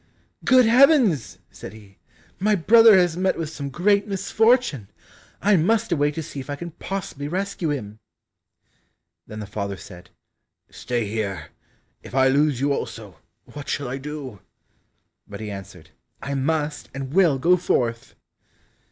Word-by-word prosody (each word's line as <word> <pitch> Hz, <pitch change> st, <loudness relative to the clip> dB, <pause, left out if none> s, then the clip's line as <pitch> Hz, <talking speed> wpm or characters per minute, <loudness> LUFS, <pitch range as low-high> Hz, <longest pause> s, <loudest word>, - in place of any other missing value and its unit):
"Good 255 Hz, -1 st, +5 dB
heavens!" 235 Hz, -, +4 dB
said -, -, -10 dB
he, 100 Hz, -3 st, -16 dB, 0.4 s
"my 210 Hz, +2 st, +2 dB
brother 225 Hz, +3 st, +6 dB
has 175 Hz, -3 st, +2 dB
met 185 Hz, +1 st, 0 dB
with 160 Hz, -2 st, -4 dB
some 140 Hz, -3 st, -6 dB
great 200 Hz, -, +1 dB
misfortune! 205 Hz, -, +1 dB, 0.6 s
I 205 Hz, 0 st, +4 dB
must 220 Hz, +6 st, +1 dB
away 145 Hz, -3 st, +2 dB
to 160 Hz, -, -5 dB
see 145 Hz, -2 st, -8 dB
if 130 Hz, -, -9 dB
I 145 Hz, -, -2 dB
can 170 Hz, +4 st, -8 dB
possibly 170 Hz, -4 st, -6 dB
rescue 185 Hz, 0 st, -3 dB
him." 110 Hz, -7 st, -5 dB, 1.3 s
Then 110 Hz, -, -8 dB
the -, -, -6 dB
father 100 Hz, -1 st, -5 dB
said, 90 Hz, -2 st, -13 dB, 0.6 s
"Stay 120 Hz, -2 st, -3 dB
here, 100 Hz, -6 st, -4 dB, 0.5 s
if -, -, -11 dB
I 130 Hz, 0 st, +4 dB
lose 140 Hz, -1 st, +2 dB
you 140 Hz, +1 st, +1 dB
also, 105 Hz, -10 st, -6 dB, 0.3 s
what 145 Hz, -1 st, -10 dB
shall 140 Hz, -, -2 dB
I 135 Hz, +2 st, -4 dB
do?" 140 Hz, -6 st, -7 dB, 0.9 s
But 100 Hz, 0 st, -9 dB
he 110 Hz, -1 st, -6 dB
answered, 95 Hz, -2 st, -10 dB, 0.3 s
"I 140 Hz, -, -5 dB
must 150 Hz, +2 st, -2 dB
and 135 Hz, 0 st, -6 dB
will 175 Hz, -7 st, +4 dB
go 170 Hz, +7 st, +4 dB
forth!" 120 Hz, -10 st, -2 dB
145 Hz, 150 wpm, -23 LUFS, 115-190 Hz, 1.3 s, brother